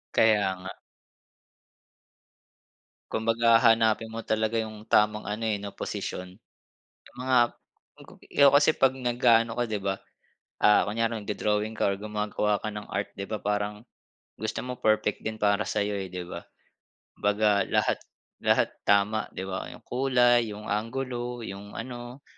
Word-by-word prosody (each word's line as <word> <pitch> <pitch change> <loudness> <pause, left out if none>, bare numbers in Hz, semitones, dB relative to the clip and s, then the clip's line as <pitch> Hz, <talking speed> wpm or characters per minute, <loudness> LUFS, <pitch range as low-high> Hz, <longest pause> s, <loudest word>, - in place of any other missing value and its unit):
Kaya 105 -4 +4
nga. 95 - -7 2.4
Kumbaga, 115 +1 +3
hahanapin 115 -1 +3
mo 115 0 -7
talaga 110 +1 0
yung 110 -1 -4
tamang 105 0 +3
ano, 105 +2 -3
eh, 105 -2 -1
'no, 100 - -5
posisyon. 90 +3 -5 0.8
Mga 130 0 +2 0.6
magupi - - -16
ikaw 140 -1 +7
kasi 145 +2 +5
'pag 135 -1 +4
nag-aano 120 -2 +3
ka, 120 - +1
'di 110 - -1
ba, 95 0 -1 0.7
ah, 105 - +6
kunyari, 115 +1 -1
nagdo-drawing 105 +1 -1
ka 100 - +2
or - - -3
gumagawa 105 0 -1
ka - - -2
ng 105 0 -7
art, 100 - -3
'di 100 - -5
ba, 110 - -2
parang 105 +1 -2 0.5
gusto 110 +1 -3
mo 125 0 -5
perfect 110 -1 +1
din 110 0 -3
para 105 0 +2
sa'yo, 105 0 -1
eh, 95 - -5
'di 90 -1 -5
ba? 85 - -6 0.8
'Baga 105 0 +3
lahat - - +1 0.4
lahat - - +3 0.2
tama, 105 +2 +3
'di 95 - -3
ba? 95 - -4
Yung - - -20
kulay, 125 -2 +3
yung 105 +1 -9
anggulo, 120 +2 -3
yung 100 +1 -8
ano, 120 +2 -7
110 Hz, 145 wpm, -27 LUFS, 105-115 Hz, 2.4 s, ikaw